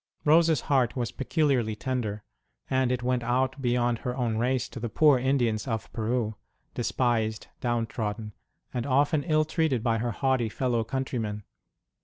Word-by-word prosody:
Rose 165 +2 +6
s 160 - +2
heart 130 -4 +1
was 120 -3 -2
peculiarly 135 -7 +1
tender, 110 -4 -3 0.5
and 130 -1 +2
it 125 -1 -1
went 125 0 +1
out 130 +3 0
beyond 120 -2 +1
her 125 +1 -4
own 115 -3 0
race 125 +1 +1
to 130 - -8
the 115 0 -3
poor 145 +2 +5
Indians 125 -4 +1
of 110 -4 -3
Peru, 115 0 -1 0.4
despised, 115 -3 0
down 120 -2 0
trodden 105 -1 -4 0.4
and 120 0 -2
often 145 +3 +3
ill 155 +1 +2
treated 150 -7 0
by 115 -2 +1
her 120 +2 -1
haughty 130 -1 +1
fellow 120 0 0
countrymen. 110 -4 -3
125 Hz, 160 wpm, -27 LUFS, 115-130 Hz, 0.5 s, Rose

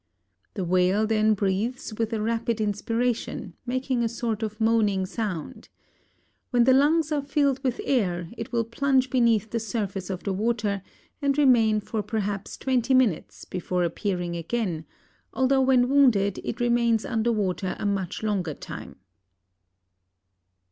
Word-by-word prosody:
The 190 -4 -2
whale 185 +4 +2
then 215 0 +3
breathes 210 +5 -2
with 225 +1 -2
a 225 - -1
rapid 230 +1 -1
inspiration, 225 +3 -2
making 255 0 -1
a 230 - +1
sort 230 -1 -3
of 215 -1 -4
moaning 215 -4 +2
sound. 195 -5 -5 0.8
When 245 -1 +3
the 260 +2 +5
lungs 305 +3 +3
are 295 -1 +1
filled 280 -1 0
with 255 -2 -1
air, 180 -10 0
it 230 0 -6
will 235 -1 +1
plunge 260 +3 +1
beneath 230 -4 +2
the 230 - 0
surface 200 -4 -3
of 185 -2 -4
the 195 - -1
water 210 -1 -1 0.4
and 280 0 +1
remain 230 -7 +4
for 215 +1 -3
perhaps 205 -1 -3
twenty 260 0 +1
minutes 245 -10 +1
before 180 0 -2
appearing 175 0 -2
again, 170 -2 -2 0.5
although 265 +1 +3
when 255 -2 +4
wounded 245 -8 +3
it 235 - -4
remains 235 -2 +2
under 235 -1 0
water 190 -3 -1
a - - -5
much 195 -1 -2
longer 190 -8 -1
time. - - -9
225 Hz, 145 wpm, -25 LUFS, 200-245 Hz, 0.8 s, the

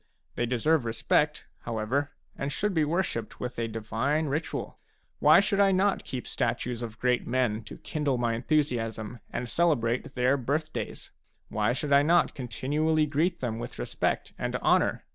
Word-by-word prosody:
They 120 - -1
deserve 130 +5 +2
respect, 150 +6 +1
however, 120 +5 -1 0.3
and 140 +1 -3
should 205 +8 -1
be 160 -3 +3
worshipped 150 - -2
with 125 -1 -4
a 115 - 0
divine 115 +8 -1
ritual. 150 +3 -3 0.4
Why - - +7
should 200 0 +1
I 200 -1 +5
not 195 +1 +2
keep 130 -2 -5
statues 120 0 -2
of 110 -2 -6
great 125 +2 +1
men 120 -3 0
to - - -9
kindle 145 -4 -1
my 120 -1 +1
enthusiasm, 115 -4 -1
and 120 0 -3
celebrate 120 -4 +1
their 130 +2 +3
birth 145 +5 -2
days? - - -5 0.4
Why 105 +2 +1
should 140 +2 -1
I 140 - +7
not 170 +4 +3
continually 150 +5 0
greet 160 +4 0
them 115 -3 -2
with 120 0 -7
respect - - -2
and - - -2
honour? - - +2
130 Hz, 160 wpm, -28 LUFS, 115-155 Hz, 0.4 s, Why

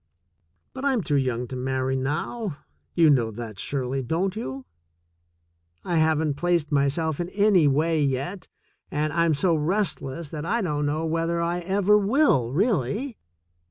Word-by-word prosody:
But 260 - -7
I'm 265 -7 +1
too 145 - 0
young 125 -3 0
to 130 - -5
marry 130 +1 -1
now. 155 - -3 0.4
You 165 -2 +5
know 120 -5 +2
that, 110 -2 -8
Shirley, 135 -1 -2
don't 170 - -1
you? 135 - -5 1.2
I 170 - 0
haven't 155 -2 +2
placed 170 -2 0
myself 145 +2 +1
in 175 0 -2
any 200 -6 +4
wa); 145 +2 +3
yet, 155 +4 -1 0.4
and 150 0 -1
I'm 170 -2 +2
so 170 +4 +2
restless 160 -3 -1
that 150 -2 -5
I 220 +6 0
don't 150 -4 -1
know 155 +2 -1
whether 165 +1 -1
I 170 +1 -1
ever 195 +3 +3
will, 200 - +2
really. 210 - 0
160 Hz, 150 wpm, -25 LUFS, 135-180 Hz, 1.2 s, You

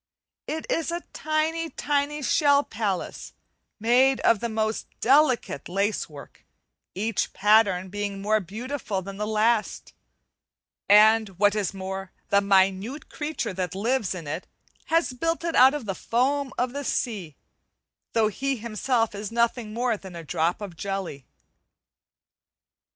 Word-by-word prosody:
It 315 +1 -3
is 330 - -1
a 345 +1 -3
tiny, 315 +1 -1
tiny 290 0 -1
shell 285 +1 +4
palace 205 -6 -4 0.5
made 250 +4 +4
of 230 - +4
the 235 - -2
most 220 0 -1
delicate 260 - +2
lacework, 185 -7 -3 0.5
each 215 +2 -1
pattern 200 -3 +3
being 205 0 -4
more 215 +2 +2
beautiful 215 - -4
than 195 +1 -8
the 210 +1 -2
last; 220 +1 0 1.0
and 215 +1 +6
what 205 +1 +4
is 200 -2 -2
more, 190 0 -5 0.2
the 200 - +4
minute 195 +6 +1
creature 300 -9 -3
that 180 -1 -3
lives 220 -1 0
in 170 -3 -7
it 155 +5 -5 0.4
has 330 -4 +1
built 330 +7 -1
it 335 -1 -2
out 260 +3 +7
of 285 -6 -5
the 195 - -2
foam 265 +7 0
of 250 0 -1
the 285 0 -4
sea, 200 - -2 0.8
though 225 -1 +3
he 270 +6 -2
himself 230 0 -1
is 205 +1 -6
nothing 235 -1 0
more 235 0 0
than 190 -3 -11
a 170 - -7
drop 165 +5 -1
of 195 -5 -7
jelly. 190 -7 -5
220 Hz, 140 wpm, -25 LUFS, 195-265 Hz, 1.0 s, out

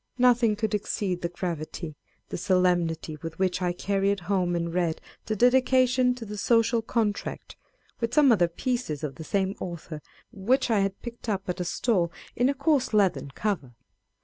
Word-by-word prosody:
Nothing 245 -3 +4
could 220 0 -2
exceed 195 -3 -1
the 170 - -1
gravity, 170 -2 -5 0.3
the - - -4
solemnity 175 -4 +1
with 165 0 -6
which 185 -1 0
I 180 -1 +1
carried 195 +2 0
home 180 -1 0
and 170 -1 -2
read 170 -3 0 0.3
the 215 - 0
Dedication 255 +1 +4
to 240 -2 -8
the 210 -1 -6
Social 230 0 +3
Contract, 220 -2 -2 0.4
with 230 -1 -1
some 290 -4 +6
other 180 -6 +4
pieces 170 - -3
of 145 -3 -3
the 160 - -9
same 195 +4 0
author, 170 -3 -6 0.3
which 235 +4 +1
I 215 - +4
had 195 0 -1
picked 235 -1 -7
up 195 -2 -2
at 180 - -3
a - - 0
stall 175 -2 +1 0.2
in 245 +2 +3
a 280 - 0
coarse 275 -4 +1
leathern 195 -8 +2
cover. 170 - -2
195 Hz, 175 wpm, -27 LUFS, 175-235 Hz, 0.4 s, some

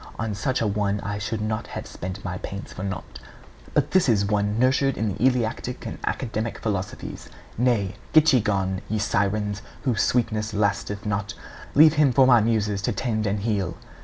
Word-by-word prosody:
On 110 -1 -2
such 130 +6 -1
a - - +1
one 105 0 0
I 100 0 -3
should 105 +1 -3
not 110 +1 -2
have - - -6
spent 95 +2 -7
my 90 -1 -3
pains 100 +1 -7
for - - -7
naught. 95 -9 -5 0.6
But 145 -1 +2
this 185 -7 +4
is 100 -3 +3
one 105 +1 0
nurtured 130 +2 +2
in 110 0 0
the 105 - -4
Eleatic 125 -1 0
and - - -6
Academic 115 -2 -2
philosophies. 100 -3 -4 0.3
Nay, 115 -5 +1 0.2
get 155 -1 +6
ye 130 - +6
gone, 95 -2 0
ye 110 - 0
sirens, 105 0 0 0.2
whose 120 -6 +1
sweetness 110 -3 0
lasteth 105 0 -1
not; 105 +1 -2 0.4
leave 155 +1 +8
him 140 -3 +5
for 135 0 +6
my 120 -3 +6
muses 105 -3 +1
to - - 0
tend 110 -4 -1
and 100 0 -1
heal!' 100 -6 -1
105 Hz, 185 wpm, -24 LUFS, 100-120 Hz, 0.6 s, leave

